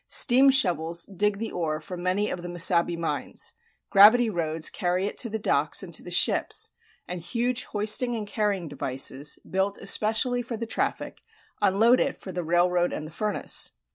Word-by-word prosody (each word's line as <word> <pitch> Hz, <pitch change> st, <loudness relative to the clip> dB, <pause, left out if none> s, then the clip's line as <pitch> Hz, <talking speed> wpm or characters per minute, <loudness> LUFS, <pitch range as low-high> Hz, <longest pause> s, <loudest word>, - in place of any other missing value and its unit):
Steam 265 Hz, +2 st, +5 dB
shovels 170 Hz, -, +1 dB
dig 200 Hz, +1 st, -1 dB
the 225 Hz, +1 st, -5 dB
ore 155 Hz, -3 st, -3 dB
from 175 Hz, +3 st, -8 dB
many 185 Hz, +3 st, 0 dB
of 175 Hz, -, -5 dB
the 175 Hz, -, -7 dB
Mesabi 175 Hz, 0 st, +1 dB
mines; 155 Hz, -4 st, -3 dB, 0.4 s
gravity 220 Hz, +4 st, +6 dB
roads 160 Hz, -3 st, 0 dB
carry 180 Hz, -1 st, -1 dB
it 205 Hz, -, -4 dB
to 235 Hz, -, +1 dB
the 220 Hz, -, -3 dB
docks 215 Hz, -, 0 dB
and -, -, -10 dB
to -, -, 0 dB
the -, -, -10 dB
ships, -, -, +2 dB, 0.4 s
and 180 Hz, -1 st, -5 dB
huge 240 Hz, +7 st, -2 dB
hoisting 215 Hz, +4 st, 0 dB
and 215 Hz, -2 st, -4 dB
carrying 205 Hz, -4 st, -2 dB
devices, 135 Hz, 0 st, 0 dB
built 190 Hz, +1 st, -1 dB
especially 220 Hz, +5 st, +1 dB
for 235 Hz, -1 st, -6 dB
the 230 Hz, -, -4 dB
traffic, 225 Hz, -, -3 dB, 0.4 s
unload 215 Hz, +5 st, +4 dB
it 275 Hz, -, -1 dB
for 190 Hz, -, -8 dB
the 180 Hz, -1 st, -4 dB
railroad 175 Hz, +1 st, +1 dB
and 155 Hz, -, -5 dB
the 155 Hz, -, -10 dB
furnace. 210 Hz, +4 st, -1 dB
190 Hz, 175 wpm, -25 LUFS, 170-220 Hz, 0.4 s, gravity